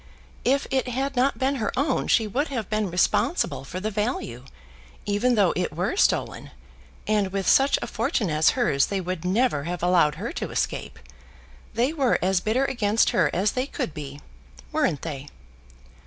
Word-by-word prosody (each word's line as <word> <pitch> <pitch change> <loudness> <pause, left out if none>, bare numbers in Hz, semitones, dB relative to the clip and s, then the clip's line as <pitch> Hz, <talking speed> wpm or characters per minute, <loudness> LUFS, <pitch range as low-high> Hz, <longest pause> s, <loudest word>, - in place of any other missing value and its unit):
If 275 +3 +2
it 265 -1 +1
had 270 +3 -2
not 260 +3 +2
been 270 +1 0
her 220 - -1
own 275 0 0
she 225 - +3
would 265 +9 -1
have 230 -7 -4
been 215 -2 0
responsible 175 - +1
for 180 +7 -6
the 215 +3 -3
value, 220 - -3 0.6
even 210 +5 +1
though 200 -5 +3
it 180 -2 -1
were 180 - -2
stolen; - - +1 0.6
and 210 -3 +1
with 195 -1 -2
such 270 +1 +5
a - - -1
fortune 225 - -1
as 155 +1 +4
hers 145 - +2
they 200 - -2
would 185 -2 -4
never 185 - +1
have 175 0 -4
allowed 175 -4 +3
her - - -5
to - - -4
escape. - - -3 0.8
They 245 +6 +1
were 275 -6 +2
as 185 0 +1
bitter 235 +7 +1
against 225 -5 +2
her 165 -5 +3
as 195 +4 +1
they 255 +2 -2
could 165 - -4
be; 145 -1 -7 0.5
weren't 275 - 0
they?" 145 -3 -5
210 Hz, 175 wpm, -25 LUFS, 180-255 Hz, 0.8 s, such